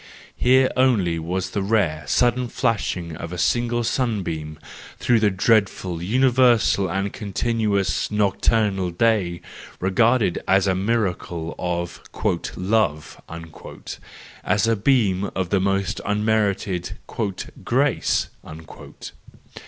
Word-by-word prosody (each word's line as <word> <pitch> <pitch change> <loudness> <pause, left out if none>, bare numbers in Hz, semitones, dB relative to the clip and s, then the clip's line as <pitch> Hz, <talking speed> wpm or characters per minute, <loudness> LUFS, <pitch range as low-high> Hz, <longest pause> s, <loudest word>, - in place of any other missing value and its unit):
Here 130 +1 +3
only 105 -11 +2
was 90 +3 -3
the 100 - -2
rare, 95 -8 0
sudden 125 - +2
flashing 95 -9 -2
of 85 - -7
a 90 - -5
single 120 +5 +1
sunbeam 90 - -2 0.4
through 120 -2 +2
the 105 -1 +3
dreadful, 95 -4 +1
universal 120 -2 +3
and 95 +3 -2
continuous 105 -1 -1
nocturnal 105 -2 +1
day 90 -2 +1 0.4
regarded 110 +2 +2
as 95 0 +4
a 95 - +2
miracle 90 -5 -2
of 85 -1 -3 0.5
"love," 90 -6 -1 1.2
as 105 - +1
a 115 0 +2
beam 100 -4 +1
of 95 -2 -2
the 100 - +3
most 95 0 -1
unmerited 105 -3 0 0.3
" 95 - -9
grace." - - +1
100 Hz, 105 wpm, -22 LUFS, 90-115 Hz, 1.2 s, as